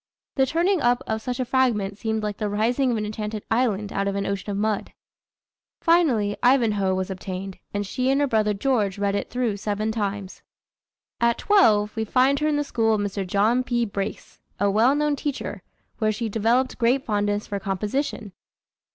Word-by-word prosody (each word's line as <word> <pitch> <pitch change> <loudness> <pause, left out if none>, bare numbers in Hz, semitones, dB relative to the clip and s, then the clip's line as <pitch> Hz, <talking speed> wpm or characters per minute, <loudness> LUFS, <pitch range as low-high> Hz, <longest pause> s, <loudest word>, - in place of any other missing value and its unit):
The 265 -1 +2
turning 345 +4 +1
up 245 +2 +2
of 220 0 -2
such 250 +2 -4
a 255 - 0
fragment 230 -7 +1
seemed 220 0 -2
like 210 -1 -3
the 210 -2 -2
rising 235 +6 +1
of 235 - 0
an 210 - -2
enchanted 210 0 -4
island 215 -4 0
out 200 0 -1
of 200 - -1
an 200 0 -1
ocean 200 +1 -3
of 200 - -2
mud." 210 0 -1 0.9
Finally 265 -12 +3
Ivanhoe 215 -7 +3
was 185 +1 -2
obtained, 190 0 -6
and 205 0 -2
she 255 +6 -1
and 270 +1 +3
her 290 - +3
brother 215 -5 +1
George 210 -4 0
read 200 0 0
it 200 - -2
through 240 -4 -1
seven 210 +1 -2
times. 200 -3 -4 0.8
At 235 0 +2
twelve, 215 - +3
we 220 - -1
find 260 +5 +3
her 305 - +1
in 305 - +1
the 290 - +1
school 225 -5 +1
of 210 - -1
Mr. 200 -1 -3
John 215 +7 +2
P. 240 -1 0
Brace, 200 -1 -5 0.2
a 200 0 +2
well 230 +7 +4
known 295 0 +1
teacher, 285 0 -4 0.4
where 215 -2 +2
she 225 +1 -3
developed 235 +5 +1
great 250 +3 +2
fondness 205 -1 0
for 200 -1 -4
composition. 205 +3 -3
220 Hz, 190 wpm, -24 LUFS, 205-255 Hz, 0.9 s, well